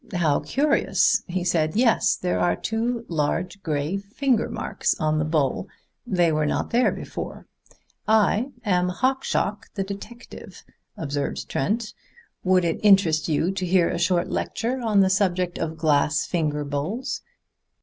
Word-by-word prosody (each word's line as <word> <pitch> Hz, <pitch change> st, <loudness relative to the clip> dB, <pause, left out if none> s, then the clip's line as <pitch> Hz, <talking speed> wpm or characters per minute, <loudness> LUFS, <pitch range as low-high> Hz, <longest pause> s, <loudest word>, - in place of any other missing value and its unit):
"How 155 Hz, -5 st, +2 dB
curious," 225 Hz, -, +2 dB
he 180 Hz, 0 st, -2 dB
said. 165 Hz, -2 st, +1 dB
"Yes, 230 Hz, 0 st, +3 dB
there 90 Hz, +1 st, -1 dB
are 90 Hz, 0 st, +2 dB
two 230 Hz, -, -2 dB
large 170 Hz, +5 st, -2 dB
gray 150 Hz, +3 st, -1 dB
finger 230 Hz, +4 st, 0 dB
marks -, -, -2 dB
on 155 Hz, -1 st, +1 dB
the 155 Hz, -, 0 dB
bowl. 155 Hz, +2 st, 0 dB, 0.4 s
They 175 Hz, -6 st, +2 dB
were 155 Hz, -1 st, +1 dB
not -, -, -1 dB
there 245 Hz, +2 st, +3 dB
before." -, -, -7 dB, 0.6 s
"I 220 Hz, +3 st, +3 dB, 0.2 s
am 180 Hz, -3 st, +2 dB
Hawkshaw 255 Hz, 0 st, 0 dB, 0.2 s
the 195 Hz, -, -1 dB
detective," 200 Hz, +5 st, -10 dB, 0.3 s
observed 145 Hz, -2 st, -3 dB
Trent. 215 Hz, -, -1 dB, 0.5 s
"Would 185 Hz, -1 st, +3 dB
it 165 Hz, -, -1 dB
interest 190 Hz, -7 st, +4 dB
you 160 Hz, +4 st, +1 dB
to 190 Hz, -1 st, -4 dB
hear 180 Hz, -1 st, +3 dB
a 170 Hz, -, -2 dB
short 175 Hz, 0 st, +1 dB
lecture 250 Hz, +3 st, -2 dB
on 215 Hz, -4 st, +3 dB
the 190 Hz, -, +4 dB
subject 185 Hz, -2 st, 0 dB
of 160 Hz, 0 st, -3 dB
glass 150 Hz, -1 st, +2 dB
finger 150 Hz, -4 st, -1 dB
bowls? 155 Hz, -, -3 dB
180 Hz, 145 wpm, -24 LUFS, 155-210 Hz, 0.6 s, interest